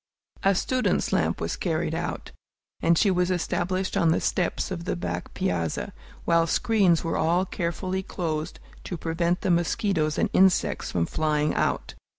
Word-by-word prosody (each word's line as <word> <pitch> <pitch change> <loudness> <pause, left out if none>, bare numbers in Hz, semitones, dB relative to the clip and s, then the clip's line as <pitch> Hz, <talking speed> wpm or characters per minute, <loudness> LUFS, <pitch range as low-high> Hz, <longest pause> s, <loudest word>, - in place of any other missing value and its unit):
A 195 0 +3
student's 255 +6 0
lamp - - +1
was - - -2
carried - - -1
out, - - -4 0.5
and 170 0 +4
she 200 - +4
was 180 0 +1
established 185 +1 -1
on 165 - +3
the 160 - +3
steps 180 +1 -1
of 170 -2 -4
the - - -1
back 85 - -4
piazza, 85 -3 -2 0.3
while 170 -1 +3
screens 200 -5 +3
were 165 - -1
all 170 +4 +2
carefully 185 +2 -2
closed 160 -5 -4 0.3
to 175 - -4
prevent 170 +2 -1
the 185 - +1
mosquitoes 170 -2 +1
and - - +1
insects 190 -1 +3
from 85 -2 +1
flying 150 - 0
out. - - -1
170 Hz, 160 wpm, -26 LUFS, 160-185 Hz, 0.5 s, and